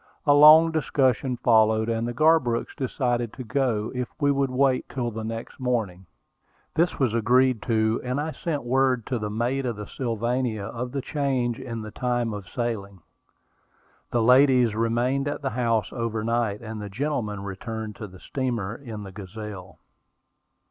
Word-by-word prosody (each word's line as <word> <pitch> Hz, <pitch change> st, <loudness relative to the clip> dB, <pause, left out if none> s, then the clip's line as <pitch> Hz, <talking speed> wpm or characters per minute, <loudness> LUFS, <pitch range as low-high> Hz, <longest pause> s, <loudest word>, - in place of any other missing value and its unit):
A 145 Hz, -, +6 dB
long 155 Hz, +3 st, +8 dB
discussion 130 Hz, -5 st, +1 dB
followed; 110 Hz, -2 st, +3 dB
and 115 Hz, 0 st, -1 dB
the -, -, -2 dB
Garbrooks 155 Hz, -5 st, +2 dB
decided 120 Hz, -4 st, -1 dB
to 130 Hz, -, -7 dB
go 115 Hz, -3 st, -1 dB
if 125 Hz, -1 st, -3 dB
we 145 Hz, -2 st, +3 dB
would 140 Hz, -1 st, +1 dB
wait 130 Hz, 0 st, +1 dB
till 120 Hz, -3 st, -3 dB
the 110 Hz, 0 st, -5 dB
next 115 Hz, +3 st, -6 dB
morning. 110 Hz, -8 st, -2 dB, 0.7 s
This 170 Hz, +3 st, +1 dB
was 130 Hz, -5 st, +1 dB
agreed 125 Hz, +1 st, +3 dB
to; 110 Hz, -1 st, +1 dB
and 125 Hz, +2 st, -2 dB
I 155 Hz, +2 st, -2 dB
sent 155 Hz, -4 st, -3 dB
word 130 Hz, -1 st, +1 dB
to 125 Hz, -, -2 dB
the 105 Hz, -1 st, -3 dB
mate 120 Hz, +6 st, -1 dB
of 120 Hz, -3 st, -2 dB
the 105 Hz, 0 st, -7 dB
Sylvania 120 Hz, -1 st, -2 dB
of 125 Hz, +4 st, -5 dB
the 140 Hz, -, -2 dB
change 130 Hz, -5 st, -1 dB
in 115 Hz, -3 st, -6 dB
the 110 Hz, -, -8 dB
time 120 Hz, -2 st, -1 dB
of 100 Hz, -3 st, -7 dB
sailing. 100 Hz, -6 st, -4 dB, 1.1 s
The 120 Hz, -2 st, +1 dB
ladies 125 Hz, -2 st, +5 dB
remained 120 Hz, +5 st, 0 dB
at 145 Hz, -, -4 dB
the 135 Hz, -, -1 dB
house 115 Hz, -4 st, 0 dB
overnight, 115 Hz, -2 st, -1 dB
and 110 Hz, -1 st, -6 dB
the 105 Hz, -, -6 dB
gentlemen 110 Hz, -4 st, -3 dB
returned 110 Hz, +2 st, -6 dB
to 105 Hz, -, -6 dB
the 95 Hz, -1 st, -14 dB
steamer 120 Hz, -6 st, -3 dB
in 115 Hz, -6 st, -8 dB
the 95 Hz, -, -9 dB
Gazelle. 100 Hz, -1 st, -9 dB
120 Hz, 165 wpm, -25 LUFS, 110-130 Hz, 1.1 s, long